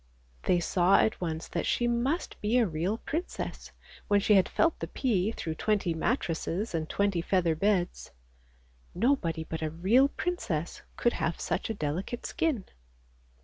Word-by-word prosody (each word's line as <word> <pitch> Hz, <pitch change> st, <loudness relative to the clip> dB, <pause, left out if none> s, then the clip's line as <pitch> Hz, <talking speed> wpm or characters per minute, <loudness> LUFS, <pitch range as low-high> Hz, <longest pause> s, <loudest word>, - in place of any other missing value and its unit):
" -, -, -32 dB
They 175 Hz, -, +4 dB
saw 180 Hz, +2 st, +3 dB
at 220 Hz, -, +2 dB
once 165 Hz, -2 st, -3 dB
that 170 Hz, -, -2 dB
she 240 Hz, -, +1 dB
must 245 Hz, +8 st, -1 dB
be 215 Hz, +4 st, +2 dB
a 240 Hz, -, +4 dB
real 175 Hz, +4 st, -1 dB
princess 325 Hz, +9 st, -5 dB, 0.4 s
when 205 Hz, -1 st, +4 dB
she 210 Hz, +1 st, +3 dB
had 190 Hz, -2 st, +5 dB
felt 330 Hz, -1 st, +2 dB
the -, -, -3 dB
pea 215 Hz, -6 st, 0 dB
through 160 Hz, -7 st, -4 dB
twenty 195 Hz, 0 st, 0 dB
mattresses 175 Hz, -, -1 dB
and 160 Hz, -1 st, -2 dB
twenty 200 Hz, -4 st, +1 dB
feather 175 Hz, -2 st, +2 dB
beds. 180 Hz, +1 st, 0 dB, 0.9 s
Nobody 180 Hz, -, +1 dB
but 160 Hz, 0 st, -5 dB
a 155 Hz, -, -1 dB
real 195 Hz, -, +4 dB
princess 225 Hz, -, -3 dB, 0.2 s
could 240 Hz, -, +2 dB
have 165 Hz, 0 st, -2 dB
such -, -, -2 dB
a 225 Hz, -, -2 dB
delicate 180 Hz, +8 st, -3 dB
skin. 315 Hz, -, -1 dB
195 Hz, 160 wpm, -29 LUFS, 165-235 Hz, 0.9 s, had